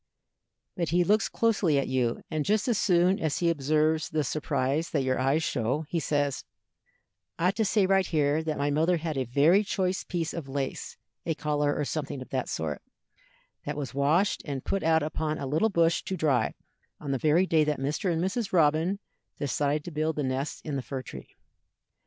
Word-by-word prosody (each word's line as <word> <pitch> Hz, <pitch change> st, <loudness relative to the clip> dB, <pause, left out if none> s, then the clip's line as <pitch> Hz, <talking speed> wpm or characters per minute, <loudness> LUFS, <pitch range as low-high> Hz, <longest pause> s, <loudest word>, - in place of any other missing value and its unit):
But 170 Hz, -4 st, -1 dB
he 175 Hz, +2 st, +3 dB
looks 210 Hz, +4 st, +2 dB
closely 205 Hz, -10 st, +2 dB
at 140 Hz, -, 0 dB
you, 125 Hz, -3 st, 0 dB
and 155 Hz, -1 st, 0 dB
just 215 Hz, -, +1 dB
as 235 Hz, -4 st, +1 dB
soon 180 Hz, +1 st, +3 dB
as 155 Hz, -2 st, -1 dB
he 170 Hz, -1 st, +2 dB
observes 155 Hz, +1 st, +1 dB
the 155 Hz, -1 st, 0 dB
surprise 140 Hz, +2 st, -1 dB
that 140 Hz, -4 st, 0 dB
your 130 Hz, -1 st, 0 dB
eyes 135 Hz, +5 st, +2 dB
show, 130 Hz, +5 st, -1 dB
he 170 Hz, -, 0 dB
says: 145 Hz, -3 st, -1 dB, 0.9 s
"I 175 Hz, +2 st, +2 dB
ought 195 Hz, -, -2 dB
to 220 Hz, -, +2 dB
say 205 Hz, 0 st, +3 dB
right 190 Hz, -1 st, +3 dB
here 150 Hz, -1 st, +1 dB
that 160 Hz, -1 st, -3 dB
my 145 Hz, +1 st, 0 dB
mother 165 Hz, +4 st, +2 dB
had 160 Hz, -1 st, -3 dB
a 130 Hz, -1 st, -1 dB
very 150 Hz, -, +4 dB
choice 185 Hz, -2 st, -1 dB
piece 170 Hz, -2 st, -3 dB
of 155 Hz, -5 st, -6 dB
lace, 135 Hz, -1 st, -4 dB, 0.3 s
a 165 Hz, -, -1 dB
collar 150 Hz, -2 st, 0 dB
or 150 Hz, -, -1 dB
something 145 Hz, -2 st, -4 dB
of 130 Hz, -, -9 dB
that 130 Hz, -2 st, -2 dB
sort, 75 Hz, -3 st, -3 dB, 0.9 s
that 145 Hz, 0 st, -3 dB
was 135 Hz, -5 st, -4 dB
washed 155 Hz, +9 st, +2 dB
and 140 Hz, -3 st, -5 dB
put 195 Hz, -, -1 dB
out 160 Hz, -1 st, +3 dB
upon 155 Hz, 0 st, -2 dB
a 140 Hz, -, -4 dB
little 155 Hz, +11 st, +1 dB
bush 170 Hz, -3 st, +2 dB
to 190 Hz, -, -3 dB
dry 135 Hz, -9 st, +1 dB, 0.4 s
on 145 Hz, -, -4 dB
the 135 Hz, -, 0 dB
very 155 Hz, +6 st, +3 dB
day 160 Hz, -4 st, +3 dB
that 150 Hz, -1 st, 0 dB
Mr. 150 Hz, +7 st, -1 dB
and 165 Hz, -, 0 dB
Mrs. 200 Hz, +3 st, -2 dB
Robin 165 Hz, +3 st, +3 dB, 0.4 s
decided 145 Hz, +1 st, 0 dB
to 175 Hz, -, -7 dB
build 155 Hz, 0 st, -1 dB
the 150 Hz, -, -1 dB
nest 130 Hz, +2 st, -3 dB
in 145 Hz, -3 st, -2 dB
the -, -, -2 dB
fir 130 Hz, 0 st, -5 dB
tree. -, -, -10 dB
155 Hz, 200 wpm, -28 LUFS, 140-170 Hz, 0.9 s, very